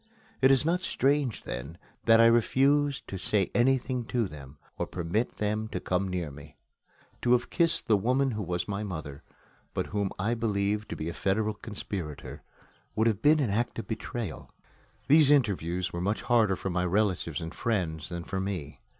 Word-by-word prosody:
It 130 - +6
is 135 +1 +4
not 170 +2 +2
strange, 140 - 0
then, 70 +7 -6 0.3
that 115 0 +6
I 115 - +8
refused 140 +5 +3
to 95 - -5
say 95 +1 0
anything 130 0 +2
to 115 -2 0
them, 70 -3 -11 0.2
or - - -1
to - - -26
permit 90 +7 -1
them 105 +1 -1
to 95 - -4
come 90 +2 -1
near 90 -5 -3
me. 70 +2 -13 0.6
To 120 - +3
have 120 -1 +1
kissed 170 -2 +1
the 110 - +5
woman 130 +6 +2
who 110 -2 -3
was 90 -2 -2
my 100 0 -3
mother, 80 -8 -6 0.5
but - - 0
whom 100 -2 0
I 105 +5 0
believed 105 -2 -1
to - - -4
be 80 - -4
a 85 - -3
federal 105 +4 0
conspirator, 100 -7 -6 0.5
would 110 - +2
have 110 -3 +1
been 155 +3 +5
an 125 -8 +1
act 115 +4 -1
of 115 - -5
betrayal. 110 -3 -5 0.6
These 150 -1 +6
interviews 90 - +1
were 85 - -3
much 100 +4 -1
harder 115 -5 +3
for 95 - -4
my 90 +1 0
relatives 90 -4 0
and 80 +1 -6
friends 90 -10 -2
than 85 -1 -5
for 95 +2 -3
me. 95 -7 -4
105 Hz, 185 wpm, -28 LUFS, 90-120 Hz, 0.6 s, I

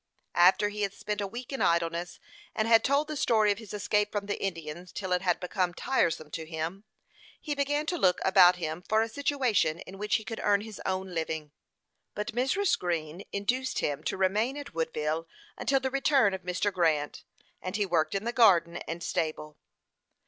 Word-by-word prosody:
After 185 +4 +5
he 210 0 -5
had 200 -1 -1
spent 210 0 -3
a 200 - -2
week 240 +6 -7
in 270 - -3
idleness, 170 +1 0 0.4
and 215 0 +1
had 225 -1 +6
told 280 +2 +2
the 310 - -4
story 220 -6 +3
of 205 - -2
his 220 -3 -10
escape 210 0 0
from 205 -1 -2
the 205 - -3
Indians 170 -1 -5
till 190 -2 -5
it 180 0 +2
had 180 -2 +1
become 180 -1 -1
tiresome 165 - 0
to 160 - -4
him, 165 +5 -5 0.5
he 300 - -3
began 290 +1 0
to 350 +1 -2
look 180 -1 +3
about 185 -1 +7
him 160 -1 -4
for 220 +4 +2
a - - -2
situation 250 - +1
in 195 +1 -10
which 210 0 +1
he 220 - -1
could 220 +2 -6
earn 205 -1 +3
his 215 -1 -9
own 190 -1 -2
living. 160 -2 -3 0.6
But 210 +3 -3
Mrs. 270 - +1
Green 170 -1 -3
induced 250 +6 -1
him 145 -2 -1
to - - -1
remain 210 +8 +1
at 285 -7 -8
Woodville 160 0 -2 0.3
until 270 +3 +1
the 265 0 -2
return 270 -6 +3
of 190 - -4
Mr. 185 +3 -1
Grant; 160 -5 0 0.4
and 185 +1 -4
he 205 -1 +1
worked 170 -1 +1
in 195 - -1
the 235 +1 -2
garden 175 -8 +5
and 170 +1 -5
stable. 155 -1 -2
195 Hz, 195 wpm, -29 LUFS, 170-225 Hz, 0.6 s, about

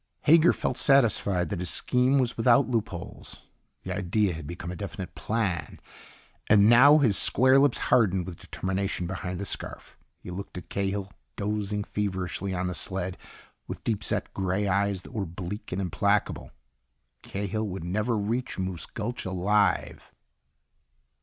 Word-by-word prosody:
Hager 165 +2 +6
felt 130 - -2
satisfied 105 - +3
that - - -3
his 90 -1 -3
scheme 125 +2 +2
was 125 -3 +1
without 120 +3 +4
loopholes. 110 -8 -4 0.4
The - - -4
idea 95 +1 +1
had 80 -2 -7
become 85 +1 -6
a - - -6
definite 100 -1 -6
plan. 95 -8 -2 0.7
And 105 -1 +6
now 135 +6 +8
his 125 -10 +3
square 130 +5 +5
lips 140 -2 +3
hardened 95 -6 +2
with 90 -2 -8
determination 95 -1 -3
behind 90 0 -4
the 100 - -3
scarf. - - -6 0.2
He 90 - -10
looked 95 +1 -7
at 90 - -9
Cahill, 100 0 -2 0.2
dozing 105 0 -2
feverishly 95 -2 -3
on 90 0 -2
the 90 - -2
sled, 95 0 -3 0.5
with - - -7
deep 110 -3 -1
set - - -1
gray 95 +2 -1
eyes 100 0 0
that - - -13
were 105 - -2
bleak 95 +5 -7
and 90 - -2
implacable. 90 -7 0 0.7
Cahill 100 +2 -3
would 95 -3 -5
never 105 +6 -1
reach 115 +5 -2
Moose 95 -3 -3
Gulch 115 +3 -5
alive. 95 +1 0
100 Hz, 150 wpm, -27 LUFS, 90-110 Hz, 0.7 s, now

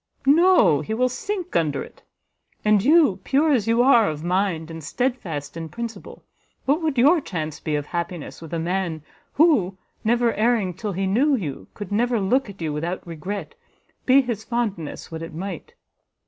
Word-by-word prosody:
No; 290 - +5
he 220 - -3
will 255 +2 +2
sink 365 +9 -4
under 155 -5 +1
it. - - -15 0.6
And 210 -2 +4
you, 290 - +4
pure 300 +3 +2
as 230 -6 +2
you 230 +1 +4
are 240 -5 +5
of 155 0 -5
mind, 175 -3 -1
and 165 -1 -8
steadfast 170 - -3
in 165 -1 -6
principle, 235 +2 -7 0.4
what 290 +5 +2
would 310 -4 -1
your 300 +7 +5
chance 160 - -5
be 155 - -2
of 145 -1 -2
happiness 170 -1 -5
with 160 - -10
a 170 - -2
man 170 -2 -2 0.3
who 255 - +3 0.3
never 235 +1 +2
erring 220 -4 +1
till 205 +3 -4
he 190 +2 -1
knew 260 +10 +3
you, 145 - -5
could 205 -2 -7
never 235 +2 +1
look 225 +5 +1
at 195 -4 -8
you 155 -2 -2
without 170 +5 -3
regret, 170 +1 -6 0.5
be 265 +2 +7
his 235 -4 -4
fondness 215 -13 -3
what 160 0 -6
it 165 -1 -7
might?" 180 -1 -6
200 Hz, 175 wpm, -23 LUFS, 165-245 Hz, 0.6 s, be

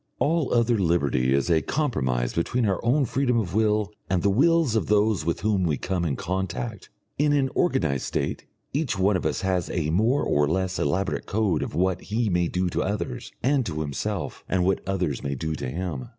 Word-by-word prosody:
All 160 -1 +1
other 115 -1 +3
liberty 70 -8 +1
is 70 0 +2
a 80 -1 +4
compromise 65 - -1
between 115 +8 0
our 95 -3 0
own 135 +4 +3
freedom 125 0 +1
of 95 -7 -1
will 105 -1 +1 0.2
and 90 -2 +1
the 100 - +3
wills 155 +2 +3
of 110 - 0
those 105 -3 +2
with 85 0 -1
whom 100 -1 +1
we 80 -5 +1
come 90 +2 -2
in 70 -5 0
contact. 95 - -4 0.3
In 145 0 +3
an 135 -2 +1
organised 80 - +1
state - - -3 0.3
each 140 -7 -1
one 95 +2 +3
of 90 - 0
us 75 - -2
has 95 -3 0
a 80 -3 -1
more 115 - +2
or 75 0 +2
less 95 +3 -1
elaborate 95 +7 -1
code 100 -6 +1
of - - -4
what 95 +2 +1
he 110 +1 -1
may 90 -2 +1
do 90 +2 -1
to - - 0
others 100 - -3
and 135 +1 +3
to 80 -2 -3
himself, 70 -3 -4
and 90 -1 +1
what 95 0 +1
others 90 -8 -1
may 70 0 -3
do 80 +4 -3
to 65 -4 -4
him. 80 -5 -4
95 Hz, 205 wpm, -25 LUFS, 80-115 Hz, 0.3 s, a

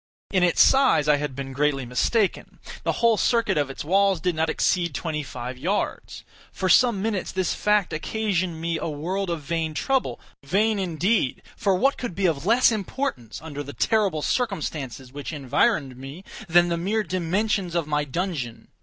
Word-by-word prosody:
In 185 - +2
its 180 -1 +5
size 265 - +4
I 150 -1 +5
had 145 -2 -4
been 135 0 -6
greatly 140 -1 0
mistaken. 190 - 0 0.2
The - - 0
whole 230 -2 +3
circuit 230 +1 +2
of 145 -3 0
its 135 - -7
walls 195 +1 +3
did 180 +2 0
not 160 0 0
exceed 170 -5 0
twenty 155 +1 -2
five 125 -2 -7
yards. 185 +9 -2 0.3
For 185 - -2
some 220 0 +4
minutes 210 -4 -2
this 185 -2 0
fact 210 -3 +1
occasioned 185 -1 -1
me 165 0 -2
a - - -3
world 180 +6 -3
of 165 -3 -3
vain 160 +1 -2
trouble; 265 - 0 0.2
vain 205 +8 +1
indeed! 180 - 0
for 195 -2 +1
what 270 +9 +2
could 240 -9 -4
be 195 +1 0
of 160 -1 0
less 240 +2 +5
importance, 205 - -3
under 145 -3 -6
the 145 0 -8
terrible 200 -9 +1
circumstances 150 - -3
which 145 +2 -6
environed 145 - 0
me, 135 +8 -9 0.3
then 175 +1 +5
the 170 - 0
mere 210 +6 0
dimensions 185 0 -1
of 170 -3 +1
my 150 0 0
dungeon? 145 -5 -4
170 Hz, 175 wpm, -24 LUFS, 150-200 Hz, 0.3 s, its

